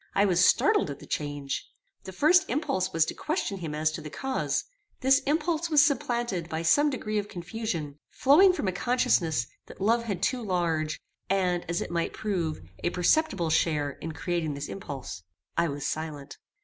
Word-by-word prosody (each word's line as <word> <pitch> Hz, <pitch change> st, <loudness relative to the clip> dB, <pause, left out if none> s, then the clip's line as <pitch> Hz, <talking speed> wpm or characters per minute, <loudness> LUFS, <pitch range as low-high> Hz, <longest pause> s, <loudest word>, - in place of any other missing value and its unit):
I 200 Hz, -, +4 dB
was 180 Hz, -2 st, +3 dB
startled 170 Hz, -, +4 dB
at 140 Hz, -, -5 dB
the -, -, -13 dB
change. 145 Hz, -2 st, -4 dB, 0.4 s
The 190 Hz, -, -6 dB
first 340 Hz, -, +4 dB
impulse 245 Hz, -, 0 dB
was 165 Hz, -1 st, +3 dB
to -, -, -4 dB
question 300 Hz, -, -2 dB
him 160 Hz, -4 st, -4 dB
as 155 Hz, 0 st, +1 dB
to -, -, -6 dB
the 150 Hz, -, -7 dB
cause. 265 Hz, -, -1 dB, 0.4 s
This 270 Hz, 0 st, +5 dB
impulse 325 Hz, +2 st, 0 dB
was 295 Hz, -2 st, +6 dB
supplanted 240 Hz, -, -1 dB
by 160 Hz, 0 st, -3 dB
some 290 Hz, -, +4 dB
degree 215 Hz, -6 st, -2 dB
of 205 Hz, -, -4 dB
confusion, 175 Hz, -6 st, -5 dB
flowing 315 Hz, +9 st, +6 dB
from 360 Hz, -, -3 dB
a -, -, +2 dB
consciousness 180 Hz, -, +1 dB, 0.2 s
that -, -, -13 dB
love 230 Hz, +4 st, +2 dB
had 195 Hz, -4 st, -3 dB
too 250 Hz, +5 st, +1 dB
large, 170 Hz, -5 st, -1 dB, 0.3 s
and, 180 Hz, -2 st, +1 dB
as 170 Hz, -, 0 dB
it -, -, -5 dB
might 170 Hz, -1 st, -1 dB
prove, 175 Hz, -, -2 dB, 0.2 s
a -, -, +2 dB
perceptible 180 Hz, -, +1 dB
share 150 Hz, -3 st, +1 dB
in 160 Hz, +3 st, -7 dB
creating 160 Hz, -1 st, -2 dB
this 140 Hz, +1 st, -5 dB
impulse. 135 Hz, -, -7 dB, 0.3 s
I 170 Hz, 0 st, +2 dB
was 145 Hz, -2 st, -4 dB
silent. 150 Hz, -3 st, -5 dB
180 Hz, 180 wpm, -28 LUFS, 155-240 Hz, 0.4 s, was